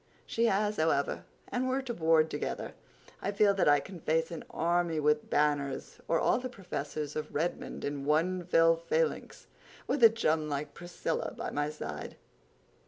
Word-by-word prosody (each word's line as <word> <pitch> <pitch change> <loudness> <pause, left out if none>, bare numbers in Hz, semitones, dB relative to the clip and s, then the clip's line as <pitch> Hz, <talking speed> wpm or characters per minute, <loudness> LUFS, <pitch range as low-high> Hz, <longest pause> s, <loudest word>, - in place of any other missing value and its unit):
He 230 - 0
has, 210 0 +1
however, 155 -3 +1 0.2
and 255 +1 -1
we're 265 +1 0
to 245 -2 -4
board 160 -3 +3
together. 145 - -4 0.5
I 200 - -1
feel 200 0 +4
that 195 -6 +3
I 145 0 +6
can 185 +4 -9
face 160 +1 0
an 165 - -6
army 170 -1 0
with 150 0 +1
banners—or 145 +2 0
all - - +2
the 255 0 -5
professors 155 - -5
of 155 0 -5
Redmond 165 +4 -2
in 145 -1 -3
one 170 +5 +1
fell 165 -1 +4
phalanx—with 285 - -3
a 230 - +11
chum 160 -9 0
like 145 0 -3
Priscilla 175 0 -4
by - - -4
my 145 +1 -1
side." 75 - -6
165 Hz, 160 wpm, -31 LUFS, 150-195 Hz, 0.5 s, a